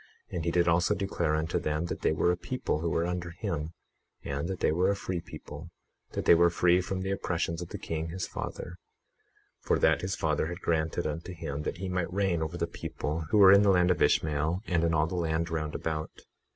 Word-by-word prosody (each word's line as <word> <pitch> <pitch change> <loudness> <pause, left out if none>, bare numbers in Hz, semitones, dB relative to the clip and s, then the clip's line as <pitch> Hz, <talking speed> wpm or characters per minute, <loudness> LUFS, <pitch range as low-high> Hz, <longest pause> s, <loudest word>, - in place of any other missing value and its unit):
And 85 -2 -3
he - - +2
did 85 0 +2
also 85 +1 +3
declare 85 -5 0
unto 80 +3 0
them 75 +1 -1
that - - -5
they - - +2
were 80 +3 +2
a - - +1
people 125 - -2
who 85 +1 -1
were 80 +1 +1
under 90 -1 -3
him, 85 -2 -4 0.5
and 70 +3 -3
that 95 -1 -4
they - - +2
were 90 +4 +2
a 100 - +2
free 90 -3 -3
people, 75 +1 -10 0.4
that - - -3
they - - +8
were 85 +1 +5
free 90 +1 +3
from 95 +1 -3
the 95 +1 -2
oppressions 85 -3 -2
of 85 - -6
the - - -5
king, 80 0 -4
his 90 +2 -3
father; 85 +1 -6 0.8
for - - +1
that 80 - +3
his 95 +1 -2
father 80 -1 0
had 85 +1 -5
granted 80 0 0
unto 80 +4 -4
him 70 -3 -4
that 75 - -3
he 95 +1 -4
might 90 -2 -2
reign 95 -3 +1
over 80 - -3
the - - 0
people 80 +3 -4
who 105 - +3
were 95 -2 +9
in 100 +1 +8
the 100 - +4
land 90 -1 +4
of 90 - 0
Ishmael, 80 +5 +2
and 85 -2 +1
in 85 -1 +2
all 75 0 +3
the 85 - -5
land 85 -1 -1
round 75 -2 -2
about. 80 -1 -4
85 Hz, 230 wpm, -29 LUFS, 80-90 Hz, 0.8 s, were